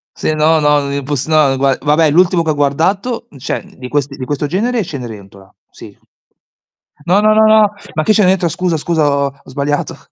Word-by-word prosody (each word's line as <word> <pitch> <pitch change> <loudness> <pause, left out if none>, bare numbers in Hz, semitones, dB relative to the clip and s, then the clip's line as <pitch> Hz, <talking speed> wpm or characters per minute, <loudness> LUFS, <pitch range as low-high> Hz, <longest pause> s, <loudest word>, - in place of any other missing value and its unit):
Sì, 155 - -2
no, 155 +1 +3
no, 150 -1 +1
imposs 140 -1 -3
no, 155 -4 +3
gua 135 0 +2
vabbè 150 +1 +2
l'ultimo 175 +2 +3
che 160 - -1
ho - - 0
guardato, 190 - -1
cioè 130 - -4
di 125 -1 -7
quest 140 0 -2
di 135 - -6
questo 145 +1 -3
genere 220 - -1
è - - -2
Cenerentola, 100 - -10 0.2
sì. - - -14 1.1
No, 185 +4 +3
no, 215 0 +4
no, 220 0 +5
no. 215 -1 +4 0.2
Ma 155 - 0
che 215 - +2
Cenerentola, 185 -4 +2
scusa, 175 +1 -1
scusa, 160 0 0
ho 140 0 0 0.2
ho - - -21
sbagliato. 145 +2 -2
155 Hz, 190 wpm, -15 LUFS, 140-185 Hz, 1.1 s, no